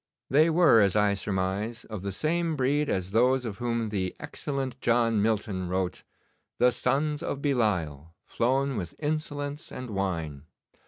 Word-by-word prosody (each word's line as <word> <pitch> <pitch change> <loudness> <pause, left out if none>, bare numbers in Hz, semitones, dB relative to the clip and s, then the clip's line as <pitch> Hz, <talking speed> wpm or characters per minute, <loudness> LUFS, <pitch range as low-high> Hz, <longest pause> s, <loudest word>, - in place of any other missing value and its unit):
They 155 +5 +5
were, 160 -9 +6
as 100 -1 +3
I 105 -1 +3
surmise, 100 +3 -2
of 110 -4 -6
the 100 +1 -3
same 165 - 0
breed 145 +2 +1
as 95 0 -1
those 125 +3 +3
of 105 -2 -5
whom 115 -2 -1
the 95 -3 -2
excellent 140 -3 -4
John 115 -2 +2
Milton 100 -4 -1
wrote: 90 -1 -2 0.6
"The 125 0 +5
sons 145 +5 0
of 140 - -3
Belial, 90 - -1
flown 135 +2 0
with 90 -4 -5
insolence 145 -1 -3
and 125 -2 -7
wine." 85 -8 -3
115 Hz, 150 wpm, -27 LUFS, 95-140 Hz, 0.6 s, were